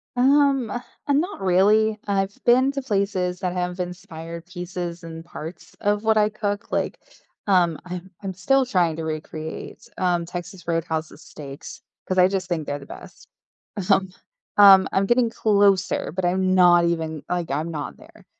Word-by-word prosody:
Um, 270 Hz, -1 st, +3 dB
uh, 245 Hz, +5 st, -5 dB
not 320 Hz, -, 0 dB
really. 210 Hz, +4 st, +3 dB
I've 195 Hz, 0 st, 0 dB
been 255 Hz, +3 st, +5 dB
to 275 Hz, -, -3 dB
places 195 Hz, -6 st, -1 dB
that 180 Hz, -2 st, -2 dB
have 180 Hz, 0 st, -3 dB
inspired 170 Hz, -2 st, -7 dB
pieces 175 Hz, -2 st, -6 dB
and 165 Hz, 0 st, -8 dB
parts 170 Hz, 0 st, -9 dB
of 205 Hz, +1 st, +1 dB
what 220 Hz, 0 st, +3 dB
I 210 Hz, 0 st, +4 dB
cook, 205 Hz, -1 st, -4 dB
like, -, -, -1 dB, 0.5 s
um, 175 Hz, -5 st, +3 dB
I'm 180 Hz, +1 st, -7 dB
I'm 195 Hz, -1 st, -4 dB
still 265 Hz, +9 st, +2 dB
trying 175 Hz, -9 st, +1 dB
to 165 Hz, -, -4 dB
recreates, 155 Hz, 0 st, -6 dB
um, 175 Hz, -2 st, +1 dB
Texas 175 Hz, +1 st, -8 dB
Roadhouse's 165 Hz, -1 st, -3 dB
steaks 140 Hz, -1 st, -10 dB, 0.3 s
'cause 185 Hz, -, -1 dB
I 180 Hz, 0 st, +7 dB
just 190 Hz, -2 st, -2 dB
think 165 Hz, -4 st, -3 dB
they're 145 Hz, 0 st, -3 dB
the 140 Hz, -, -12 dB
best. -, -, -12 dB, 0.6 s
Um, 190 Hz, -1 st, +3 dB, 0.5 s
um, 195 Hz, -2 st, +8 dB
I'm 195 Hz, 0 st, +2 dB
getting 240 Hz, +1 st, +3 dB
closer, 200 Hz, -6 st, +2 dB
but 185 Hz, 0 st, -2 dB
I'm 185 Hz, +1 st, +1 dB
not 175 Hz, -2 st, +6 dB
even 160 Hz, -3 st, -2 dB
like, 175 Hz, -2 st, -2 dB
I'm 155 Hz, +4 st, -2 dB
not 150 Hz, -3 st, -5 dB
there, -, -, -18 dB
185 Hz, 165 wpm, -23 LUFS, 170-205 Hz, 0.6 s, um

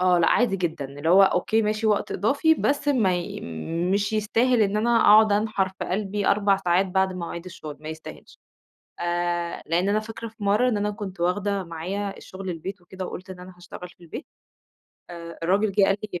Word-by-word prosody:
آه 180 Hz, -1 st, +4 dB
لأ 165 Hz, -, +4 dB
عادي 235 Hz, -5 st, +3 dB
جدًا، 170 Hz, -5 st, -2 dB
اللي 145 Hz, +3 st, -5 dB
هو 190 Hz, +3 st, +7 dB
أوكي 195 Hz, +4 st, +2 dB
ماشي 215 Hz, +1 st, -1 dB
وقت 210 Hz, -2 st, +1 dB
إضافي 280 Hz, -, +2 dB
بس 290 Hz, -1 st, 0 dB
ماي 190 Hz, -10 st, 0 dB, 0.5 s
مش 205 Hz, +1 st, 0 dB
يستاهل 225 Hz, +3 st, +2 dB
إن 205 Hz, 0 st, +1 dB
أنا 230 Hz, +2 st, +3 dB
أقعُد 215 Hz, 0 st, +6 dB
أنحر 205 Hz, -2 st, +1 dB
في 190 Hz, -, -7 dB
قلبي 200 Hz, +1 st, -2 dB
4 200 Hz, -1 st, +3 dB
ساعات 185 Hz, 0 st, +1 dB
بعد 190 Hz, 0 st, +1 dB
مواعيد 170 Hz, -1 st, -6 dB
الشغل، 155 Hz, -5 st, -9 dB
ما 155 Hz, -, -8 dB
يستاهلش. 160 Hz, 0 st, -10 dB, 0.6 s
آآ، 175 Hz, 0 st, -2 dB
لأن 175 Hz, +4 st, +1 dB
أنا 210 Hz, +1 st, +2 dB
فاكرة 225 Hz, +1 st, -7 dB
في 220 Hz, -1 st, -11 dB
مَرّة 210 Hz, +5 st, +3 dB
إن 220 Hz, -, 0 dB
أنا 205 Hz, 0 st, -1 dB
كنت 205 Hz, -3 st, -7 dB
واخدة 195 Hz, +3 st, 0 dB
معايا 185 Hz, +4 st, -4 dB
الشغل 190 Hz, 0 st, -8 dB
البيت 180 Hz, +3 st, -6 dB
وكده 185 Hz, +1 st, -7 dB
وقُلت 185 Hz, +1 st, -8 dB
إن 185 Hz, -1 st, -9 dB
أنا 180 Hz, +1 st, -11 dB
هاشتغل 180 Hz, 0 st, -10 dB
في 175 Hz, -, -22 dB
البيت 165 Hz, -, -8 dB, 0.9 s
آآ، 170 Hz, -1 st, -9 dB
الراجل 195 Hz, +4 st, +2 dB
جه 200 Hz, +1 st, +3 dB
قال 195 Hz, 0 st, +2 dB, 0.2 s
لي 175 Hz, -, -4 dB
195 Hz, 195 wpm, -24 LUFS, 175-210 Hz, 0.9 s, هو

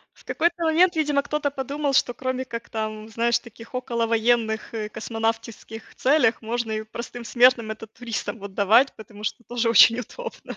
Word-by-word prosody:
В -, -, -22 dB
какой-то 340 Hz, 0 st, 0 dB
момент, 330 Hz, +2 st, +4 dB
видимо 295 Hz, -2 st, +2 dB
кто-то 295 Hz, 0 st, -1 dB
подумал, 280 Hz, +1 st, -2 dB
что 250 Hz, -2 st, +3 dB
кроме 260 Hz, 0 st, -3 dB
как 235 Hz, -1 st, -7 dB
там, 215 Hz, -1 st, -4 dB
знаешь, 235 Hz, +1 st, +1 dB
таких 230 Hz, +1 st, -14 dB
околовоенных 230 Hz, -2 st, 0 dB
и 215 Hz, -1 st, -3 dB
космонавтиских 225 Hz, 0 st, -4 dB
целях, 255 Hz, -5 st, +2 dB
можно 230 Hz, 0 st, -2 dB
и 215 Hz, 0 st, -2 dB
простым 235 Hz, +2 st, -8 dB
смертным 240 Hz, -1 st, +4 dB
это, 220 Hz, +1 st, -7 dB
туристам 230 Hz, +1 st, -5 dB
вот 200 Hz, -1 st, -9 dB
давать. 225 Hz, +7 st, +4 dB
Потому 210 Hz, -1 st, -12 dB
что 235 Hz, -, -4 dB
тоже 240 Hz, -1 st, -1 dB
очень 230 Hz, +1 st, +7 dB
удобно. 470 Hz, -, -8 dB
235 Hz, 165 wpm, -24 LUFS, 220-260 Hz, -, очень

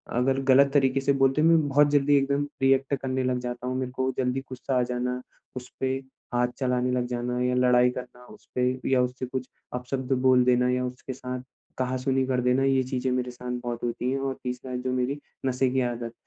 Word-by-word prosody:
अगर 130 Hz, +2 st, +2 dB
गलत 140 Hz, +1 st, +6 dB
तरीके 135 Hz, -1 st, +3 dB
से 140 Hz, +1 st, +2 dB
बोलते 135 Hz, +2 st, +3 dB
हैं 160 Hz, -, +5 dB
मैं 165 Hz, -3 st, +4 dB
बहुत 145 Hz, +1 st, +4 dB
जल्दी 145 Hz, 0 st, +4 dB
एकदम 140 Hz, +1 st, +1 dB, 0.2 s
रिएक्ट 135 Hz, +1 st, +3 dB
करने 130 Hz, -1 st, -2 dB
लग 125 Hz, -1 st, 0 dB
जाता 125 Hz, 0 st, -5 dB
हूँ। 130 Hz, -, -2 dB
मेरे 130 Hz, -1 st, -3 dB
को 130 Hz, 0 st, -1 dB
जल्दी 130 Hz, 0 st, 0 dB
गुस्सा 130 Hz, +1 st, -2 dB
आ -, -, +3 dB
जाना, 125 Hz, +1 st, -2 dB, 0.3 s
उसपे 130 Hz, +1 st, -3 dB, 0.4 s
हाथ 120 Hz, 0 st, +2 dB
चलाने 125 Hz, -1 st, +1 dB
लग 125 Hz, -1 st, 0 dB
जाना 125 Hz, 0 st, -2 dB
या 125 Hz, 0 st, +1 dB
लड़ाई 125 Hz, 0 st, +4 dB
करना 125 Hz, 0 st, -9 dB
उसपे 125 Hz, +3 st, -3 dB, 0.2 s
या 130 Hz, -1 st, +4 dB
उससे 125 Hz, +1 st, -2 dB
कुछ 130 Hz, 0 st, -4 dB, 0.3 s
अपशब्द 130 Hz, +1 st, -2 dB
बोल 130 Hz, -1 st, +5 dB
देना 125 Hz, 0 st, +3 dB
या 125 Hz, 0 st, 0 dB
उसके 125 Hz, +1 st, -6 dB
साथ 125 Hz, -1 st, -5 dB, 0.4 s
कहासुनी 130 Hz, +1 st, 0 dB
कर 130 Hz, -1 st, +1 dB
देना 125 Hz, +2 st, +2 dB
ये 135 Hz, -1 st, +3 dB
चीज़ें 130 Hz, 0 st, -2 dB
मेरे 125 Hz, 0 st, -1 dB
साथ 125 Hz, 0 st, -7 dB
बहुत 120 Hz, -1 st, -4 dB
होती 120 Hz, +1 st, -1 dB
है 135 Hz, -, -1 dB
और 135 Hz, 0 st, -1 dB
तीसरा 125 Hz, 0 st, -4 dB
जो 125 Hz, +1 st, -2 dB
मेरी 130 Hz, +3 st, -1 dB, 0.3 s
नशे 130 Hz, 0 st, +1 dB
की 130 Hz, 0 st, +1 dB
आदत। 120 Hz, -1 st, -3 dB
125 Hz, 205 wpm, -26 LUFS, 125-135 Hz, 0.4 s, गलत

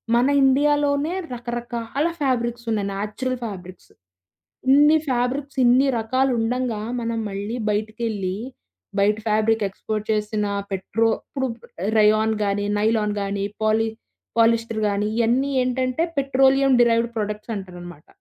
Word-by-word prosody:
మన 240 Hz, +1 st, +4 dB, 0.2 s
'ఇండియాలోనే' 290 Hz, +3 st, +2 dB, 0.2 s
రకరకాల 240 Hz, +2 st, -3 dB, 0.2 s
ఫ్యాబ్రిక్స్ 240 Hz, -3 st, -1 dB
ఉన్నాయి. 205 Hz, -2 st, 0 dB
Natural 215 Hz, +6 st, -3 dB
fabrics. 185 Hz, -4 st, -9 dB, 0.8 s
ఇన్ని 295 Hz, +3 st, +6 dB
ఫ్యాబ్రిక్స్, 260 Hz, +3 st, -1 dB
ఇన్ని 255 Hz, +3 st, +5 dB
రకాలు 255 Hz, +4 st, +1 dB
ఉండంగా, 235 Hz, -1 st, -1 dB, 0.2 s
మనం 230 Hz, 0 st, -2 dB
మళ్లీ 205 Hz, +4 st, -4 dB
బయటికేళ్లి, 210 Hz, -3 st, -2 dB, 0.6 s
బయట 205 Hz, +1 st, +3 dB
ఫ్యాబ్రిక్ 220 Hz, +1 st, +2 dB
ఎక్స్పోర్ట్ 215 Hz, +2 st, -4 dB
చేసిన 210 Hz, 0 st, -1 dB, 0.3 s
పెట్రో 205 Hz, +4 st, 0 dB
ఇపుడు 265 Hz, -2 st, -3 dB, 0.5 s
రేయాన్ 215 Hz, +1 st, +4 dB
గానీ, 200 Hz, 0 st, -1 dB
నైలాన్ 215 Hz, -1 st, +1 dB
గానీ, 200 Hz, 0 st, -2 dB, 0.2 s
పాలి 220 Hz, +1 st, +2 dB, 0.5 s
పాలిస్టర్ 230 Hz, -1 st, +2 dB
గానీ, 205 Hz, +1 st, 0 dB
ఇవన్నీ 245 Hz, +4 st, +2 dB
ఏంటంటే 255 Hz, +4 st, 0 dB
పెట్రోలియం 270 Hz, 0 st, +3 dB
డెరైవ్డ్ 235 Hz, 0 st, +3 dB
ప్రొడక్ట్స్ 210 Hz, +1 st, -3 dB
అంటారన్నమాట. 175 Hz, -5 st, -9 dB
230 Hz, 110 wpm, -22 LUFS, 210-255 Hz, 0.8 s, ఇన్ని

